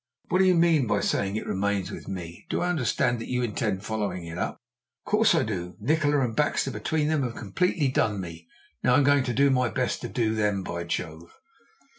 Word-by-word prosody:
"What 185 - +2
do 190 - +5
you 185 -1 +5
mean 165 -6 +4
by 100 -1 +2
saying 100 0 0
it 110 - -3
remains 100 0 -1
with - - -8
me? 85 -3 -7
Do - - -1
I 175 - 0
understand 120 -5 +1
that 115 - -6
you 125 0 -1
intend 105 -3 -2
following 100 -5 -3
it 85 0 -7
up?" 90 - -2 0.5
"Of - - -9
course 210 -3 +4
I 160 - +3
do. 90 -6 -4
Nikola 145 +4 +2
and 120 -4 -1
Baxter 150 -2 +1
between 150 +3 -1
them 155 -2 +1
have 120 -3 -3
completely 145 - 0
done 110 -5 +1
me 85 -2 -8 0.4
now 125 - +4
I'm 145 - +5
going 140 0 +4
to 120 - -1
do 140 0 +4
my 125 -2 +2
best 125 +1 -1
to - - -5
do 115 -3 0
them. 105 -3 0
By 85 -1 -4
Jove!" 85 -1 -5
115 Hz, 220 wpm, -26 LUFS, 95-145 Hz, 0.5 s, do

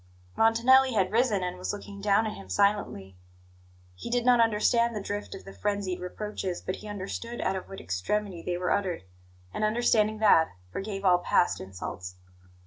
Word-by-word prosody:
Montanelli 250 +4 +5
had 190 -3 +1
risen, 220 -4 +2
and 180 0 -4
was 185 - -2
looking 200 -1 -8
down 205 +2 +3
at 215 - -3
him 95 -1 -11
silently. 95 - 0 0.8
He 90 - -8
did 245 0 0
not 250 -1 +5
understand 230 +1 +3
the - - -2
drift 205 0 -5
of 195 - -11
the 195 - -10
frenzied 200 -3 -2
reproaches, 185 0 -4
but 185 - -4
he - - -10
understood 205 +4 -5
out 190 - 0
of 190 - -6
what 195 - -8
extremity 175 - -2
they 175 +1 -2
were 180 0 -1
uttered; 190 - -1 0.5
and, - - -3
understanding 215 -1 +2
that, 180 - +4 0.2
forgave 195 - -5
all 180 -1 +5
past 175 - +2
insults. 90 -1 -7
200 Hz, 175 wpm, -28 LUFS, 180-220 Hz, 0.8 s, Montanelli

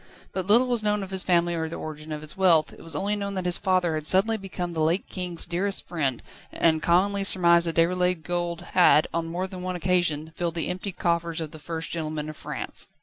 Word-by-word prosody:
But 190 -1 -3
little 235 +5 +6
was 245 -3 +1
known 210 -1 0
of 190 - -8
his 190 -1 +1
family 175 -1 +2
or 160 -1 -2
the 165 - -6
origin 155 0 -7
of 150 0 -5
its 155 - -4
wealth; 175 -5 +3
it - - -14
was 165 -2 -4
only 200 +7 0
known 200 -1 -4
that 185 -1 -3
his 180 -1 +3
father 185 -4 +1
had 155 -1 -2
suddenly 200 +4 +3
become 185 -4 -5
the 160 - -2
late 165 +5 +1
King's 180 -3 -3
dearest 185 +3 -1
friend, 140 -8 -2 0.3
and 160 -1 +2
commonly 195 +4 +2
surmised 170 -3 +4
that 165 - -2
Déroulède 180 0 +2
gold 175 0 -2
had 175 -4 +6
on 165 0 -1
more 175 +3 -3
than 185 -1 -8
one 185 0 -3
occasion 175 -3 0
filled 170 -1 -2
the 165 - -1
emptied 180 +1 -4
coffers 170 -1 0
of 160 -2 -5
the 155 - -10
First 165 +1 -5
Gentleman 155 -2 -4
of - - -14
France. - - -4
175 Hz, 230 wpm, -25 LUFS, 160-185 Hz, 0.3 s, little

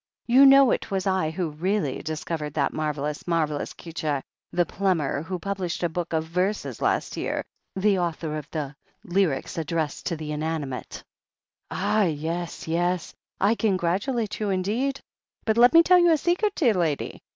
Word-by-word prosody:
You 260 +3 +7
know 275 -2 +7
it - - -1
was 195 -2 -1
I 190 -4 +1
who 165 0 -3
really 165 -2 -1
discovered 155 -1 -4
that 140 -3 +1
marvellous, 150 0 -3
marvellous 155 -4 0
c'eature, 155 -4 -3 0.3
the 175 0 +2
plumber 165 -6 0
who 185 +3 -4
published 185 -1 -3
a 175 - +2
book 170 +1 -4
of 160 -1 +1
verses 180 +6 -2
last - - 0
year - - -2 0.2
— - - -16
^the 195 -1 +3
author 160 -2 -2
of 150 -2 -6
the 150 -3 -4 0.3
'Lyrics 175 -5 0
addressed 160 -2 -2
to 170 - -1
the 155 -1 -6
Inanimate' 150 -4 -4 0.4
?" - - -60
"Ah, 215 -1 +1
yes, 165 +2 -3
yes! 175 +2 0 0.3
I 200 +3 +4
congratulate 205 +3 0
you 210 -2 -1
indeed. 220 +9 0 0.5
But 220 0 +1
let 245 +1 +8
me 335 0 +8
tell 360 +1 +6
you 345 0 +5
a 320 - +5
secret, 360 +7 +1
dear 250 -9 +3
lady. 165 -6 -1
175 Hz, 170 wpm, -25 LUFS, 155-205 Hz, 0.5 s, let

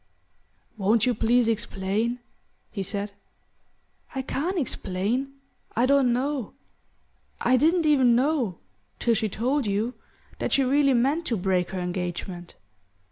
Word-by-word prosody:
"Won't 215 +3 +3
you 250 - +2
please 235 +2 +2
explain?" 220 +1 -1 0.5
he 200 - -4
said. 200 +1 -3 1.0
"I 265 - -2
can't 340 +8 -2
explain: 245 - -2 0.4
I 235 - +3
don't 270 -2 +4
know. 260 0 -2 0.8
I 255 - +3
didn't 325 +6 +3
even 260 -6 +5
know 255 - +1 0.4
till 235 - +2
she 220 -1 0
told 250 +5 0
you 210 +5 0 0.5
that - - -1
she 275 - +4
really 275 +1 +3
meant 275 +7 +1
to 230 - 0
break 185 -1 0
her 190 - -4
engagement. 180 0 -4
235 Hz, 130 wpm, -26 LUFS, 200-270 Hz, 1.0 s, even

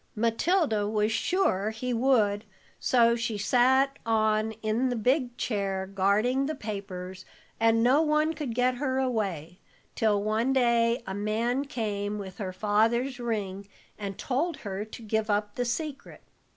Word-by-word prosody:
"Matilda 230 - +1
was 210 0 +1
sure 225 - +1
he 245 +3 -3
would, 225 -4 +2 0.4
so 235 -2 +4
she 230 -2 -2
sat 260 +6 +3
on 220 -1 +1
in 225 +4 +1
the 245 - -1
big 245 +2 0
chair, 195 -4 -2
guarding 205 +8 +1
the 310 - -3
papers, 190 -5 -6 0.4
and 225 0 +3
no 260 +5 +5
one 305 0 +2
could 290 -7 -5
get 250 0 +2
her 260 -1 -1
away, 195 - -2 0.3
till 210 -2 +1
one 220 +5 +1
day 235 -1 +2
a 190 - -4
man 225 +6 -1
came 210 -5 -3
with 195 -1 -8
her 190 -3 -3
father's 225 +7 +1
ring 200 -4 -3 0.3
and 200 -2 -6
told 285 +5 -1
her 195 0 -3
to 225 +2 -11
give 220 0 -1
up 205 0 0
the 245 - -2
secret. 285 +3 -5
225 Hz, 150 wpm, -28 LUFS, 205-255 Hz, 0.4 s, no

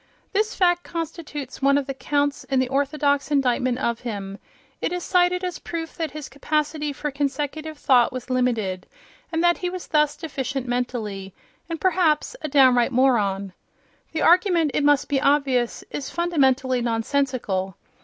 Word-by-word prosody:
This 425 +2 0
fact 350 -2 +3
constitutes 305 -5 -6
one 280 +1 +4
of 285 - -1
the 275 - -4
counts 285 +1 -1
in 270 - -1
the 260 -1 +1
orthodox 285 +1 +1
indictment 255 -3 +1
of 235 -3 -1
him: 200 -4 -6 0.4
it - - -1
is 360 0 -3
cited 360 0 +2
as 360 -3 -3
proof 325 -1 -6
that 325 -2 -2
his 300 0 -7
capacity 300 +1 -1
for 295 +1 -4
consecutive 290 +3 -3
thought 250 -4 +4
was 255 -1 -6
limited, 225 -8 0 0.4
and 325 0 0
that 345 0 +3
he 360 - -2
was 365 0 -6
thus 300 -1 +1
deficient 275 -4 -4
mentally, 215 -6 -3 0.3
and 330 -1 -4
perhaps 360 +1 +2
a - - -3
downright 260 -4 +4
moron. 205 -7 +2 0.6
The 320 - -1
argument, 345 -3 +4
it 295 - +1
must 290 -1 +3
be 275 -2 0
obvious, 275 -4 +1
is 275 - -4
fundamentally 265 -7 +1
nonsensical. 230 -5 -1
280 Hz, 155 wpm, -23 LUFS, 250-315 Hz, 0.6 s, one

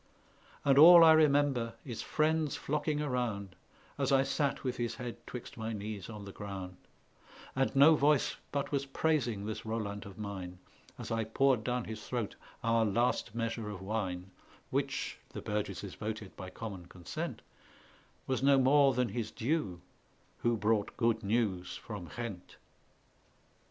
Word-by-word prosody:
And 140 -1 +5
all 170 +2 +11
I 160 - +9
remember 145 -6 +3
is 120 -5 -5
friends 155 -1 +1
flocking 150 +1 -1
around, 115 -8 -2 0.4
As 135 -1 +1
I 135 -1 +5
sate 140 0 -1
with 125 -2 -2
his 120 -1 -2
head 125 -2 -6
twixt 125 +1 -8
my 110 0 -3
knees 105 -1 -5
on 105 -2 -8
the 100 - -8
ground; 95 -3 -7 0.8
And 135 +1 +1
no 145 +4 +8
voice 145 -1 +2
but 140 -1 -2
was 140 -1 -1
praising 130 -8 0
this 110 0 -4
Roland 105 -3 -4
of 100 - -12
mine 95 -4 -6 0.4
As - - -7
I 115 0 +1
poured 125 +2 +2
down 125 +1 -1
his 110 -1 -7
throat 120 -5 -3 0.3
our 115 0 +3
last 110 0 0
measure 115 -2 -2
of 100 -3 -6
wine, 95 -2 -3 0.4
Which - - -2
(the - - -5
burgesses 100 -2 -3
voted 110 -2 -5
by 95 -1 -7
common 95 -3 -7
consent) 90 -1 -6 0.8
Was 130 -1 -1
no 140 0 +5
more 135 0 +5
than 125 -2 +1
his 110 +1 -3
due 110 - -2 0.6
who 120 -1 +1
brought 105 -1 0
good 115 -2 +2
news 100 -4 0
from 100 -7 -7
Ghent. 110 -7 -6
115 Hz, 150 wpm, -32 LUFS, 100-135 Hz, 0.8 s, all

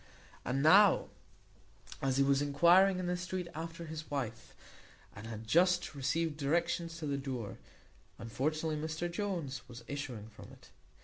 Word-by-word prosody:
And 135 +3 -1
now, 195 +5 +6 0.9
as 135 -1 +1
he 140 - +5
was 140 0 +3
enquiring 170 +7 +5
in 185 - -3
the 180 0 0
street 180 0 -4
after 165 +2 -6
his 155 -1 -7
wife, 120 -6 -4 0.6
and 105 +3 -8
had 110 -1 -7
just 180 +9 +3
received 150 +3 -1
directions 165 +3 0
to 160 - -5
the 140 -1 -1
door, 125 -7 -5 0.6
unfortunately 155 +7 -2
Mr 160 +3 -3
Jones 170 -8 -3
was 120 -1 -10
issuing 130 -7 -5
from 110 - -13
it. - - -18
155 Hz, 145 wpm, -33 LUFS, 135-170 Hz, 0.9 s, now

